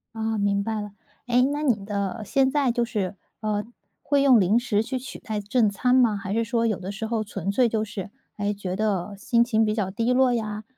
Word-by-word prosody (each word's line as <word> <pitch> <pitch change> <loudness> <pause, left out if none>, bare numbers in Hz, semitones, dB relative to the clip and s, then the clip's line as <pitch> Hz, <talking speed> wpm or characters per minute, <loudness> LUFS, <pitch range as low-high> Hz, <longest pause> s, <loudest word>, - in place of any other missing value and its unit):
哦， 220 0 -1
明 200 0 +1
白 220 -1 -2
了。 205 -1 -7 0.4
哎， 245 +1 +4
那 295 +1 -2
你 225 -9 +1
的 200 +1 -3
现 265 +3 +2
在 280 -3 +2
就 240 0 0
是， 205 -5 -2 0.3
呃， 210 -1 -1 0.4
会 280 -1 +2
用 255 -5 +6
零 200 +5 +3
食 215 -4 0
去 255 +3 -3
取 255 +1 -8
代 215 -1 -4
正 210 +1 +2
餐 250 +5 +1
吗？ 235 -5 +4
还 195 0 -4
是 230 +1 +1
说 230 +1 0
有 215 -5 0
的 190 +2 -5
时 220 +2 -5
候 220 -1 -1
纯 200 -2 -3
粹 240 +2 +3
就 220 -1 -1
是， 205 -1 -6 0.3
哎， 205 0 -1
觉 190 -2 -4
得 205 -1 -1
心 235 +3 +2
情 225 -2 +2
比 215 0 +1
较 190 -4 -1
低 230 +4 0
落 255 -1 +4
呀， 215 -2 -3
220 Hz, 245 characters per minute, -25 LUFS, 205-240 Hz, 0.4 s, 用